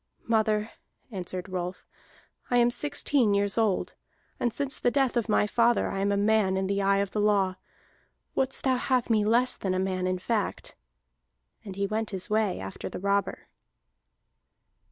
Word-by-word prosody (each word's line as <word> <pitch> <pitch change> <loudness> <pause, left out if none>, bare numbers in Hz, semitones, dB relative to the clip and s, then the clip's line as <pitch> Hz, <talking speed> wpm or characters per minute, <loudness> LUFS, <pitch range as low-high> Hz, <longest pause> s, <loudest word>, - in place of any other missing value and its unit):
"Mother," 220 -1 +1 0.4
answered 185 -2 -5
Rolf, 180 0 -5 0.6
"I 245 - +3
am 240 0 +4
sixteen 280 -5 +1
years 200 0 +1
old, 220 -4 0 0.5
and 240 - +1
since 280 +3 -2
the 245 - +2
death 270 -1 +1
of 235 -2 0
my 210 - +3
father 235 +3 +2
I 195 - -3
am 200 +1 +1
a 200 - +1
man 205 -2 +2
in 190 - 0
the 200 +1 0
eye 195 0 +3
of 200 -1 -1
the 210 - -1
law. 195 -3 +2 0.8
Wouldst 265 0 0
thou 260 -1 +2
have 250 -2 0
me 215 -2 +3
less 240 +4 +2
than 185 -2 -2
a - - 0
man 185 -1 -1
in 185 0 0
fact?" 210 +3 -2 0.9
And 195 -3 -8
he 200 +1 -1
went 215 +2 -2
his 190 0 -5
way 215 -3 +1
after 95 0 -6
the - - -6
robber. 200 +1 -1
210 Hz, 175 wpm, -27 LUFS, 190-235 Hz, 0.9 s, am